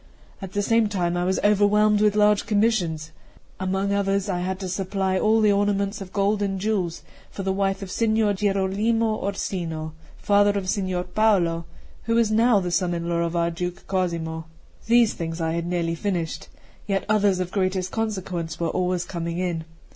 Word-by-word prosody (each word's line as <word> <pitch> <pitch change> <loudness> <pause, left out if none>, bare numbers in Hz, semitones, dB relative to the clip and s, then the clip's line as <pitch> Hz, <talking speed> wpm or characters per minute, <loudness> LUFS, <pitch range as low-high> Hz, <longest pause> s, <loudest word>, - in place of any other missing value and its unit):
At 190 -1 -7
the 205 - 0
same 225 0 +3
time 175 -4 -1
I 175 0 0
was 190 +1 +1
overwhelmed 210 +1 +4
with 210 -1 +3
large 210 -1 +3
commissions; 195 -8 +1 0.5
among 190 +1 -1
others, 200 0 0
I 180 -2 -1
had 185 +1 -3
to 190 - -3
supply 190 0 -1
all 220 +2 +3
the 210 -1 +5
ornaments 200 0 0
of 190 -1 -8
gold 205 +1 +1
and 195 -1 -1
jewels 190 -5 -1 0.3
for 195 - -6
the 190 0 0
wife 195 0 -1
of 190 - -7
Signor 220 -2 +2
Gierolimo 210 +3 +1
Orsino, 165 -5 -3 0.2
father 205 0 +3
of 190 -2 -3
Signor 185 -3 -1
Paolo, 180 -4 +1 0.4
who 230 0 +1
is 230 -2 +3
now 225 0 +4
the 180 -2 -3
son 175 -1 +1
in 170 0 -4
law 170 0 0
of 170 0 -1
our 170 0 +1
Duke 180 +1 -5
Cosimo. 165 -4 -2 0.4
These 235 -1 +4
things 165 0 -5
I 160 -1 0
had 170 +1 -2
nearly 170 -1 -1
finished; 170 -2 -3 0.4
yet 195 -1 0
others 205 -3 +2
of 180 -1 -3
the 200 - -1
greatest 185 -1 -1
consequence 185 -7 -3
were 170 -1 0
always 180 0 -1
coming 170 -1 -4
in. 175 -3 -2
195 Hz, 185 wpm, -24 LUFS, 175-205 Hz, 0.5 s, the